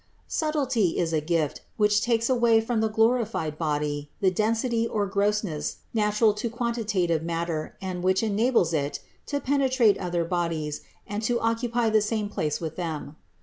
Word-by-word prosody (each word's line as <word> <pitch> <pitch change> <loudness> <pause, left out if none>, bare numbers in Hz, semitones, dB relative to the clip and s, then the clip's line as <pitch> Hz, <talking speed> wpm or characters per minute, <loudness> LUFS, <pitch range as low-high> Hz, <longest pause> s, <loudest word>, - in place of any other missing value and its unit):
172. - - -5 0.6
Subtility - - -1
is 165 -2 0
a 155 - +2
gift, 155 -2 -1 0.2
which 210 0 +3
takes 230 -1 +1
away 235 -3 +4
from 225 0 -1
the 220 - +2
glorified 220 -8 +1
body 150 -2 -1
the 190 -2 +3
density 225 +4 +1
or 210 -3 0
grossness 200 -5 -1 0.2
natural 210 0 +3
to 210 +3 -3
quanti 235 0 -2
tative 180 -6 +1
matter 165 -1 -3
and 185 -2 -4
which 185 +3 +2
enables 220 -4 +2
it 145 -2 -1 0.3
to 285 - -1
penetrate 260 -6 +3
other 175 -2 -1
bodies 165 -4 -2 0.2
and 205 +1 -4
to 235 +2 +1
occupy 230 +1 0
the 215 -1 +4
same 210 -1 -1
place 155 -7 -2
with 160 -2 -5
them. 160 -4 -4
210 Hz, 165 wpm, -26 LUFS, 165-230 Hz, 0.6 s, away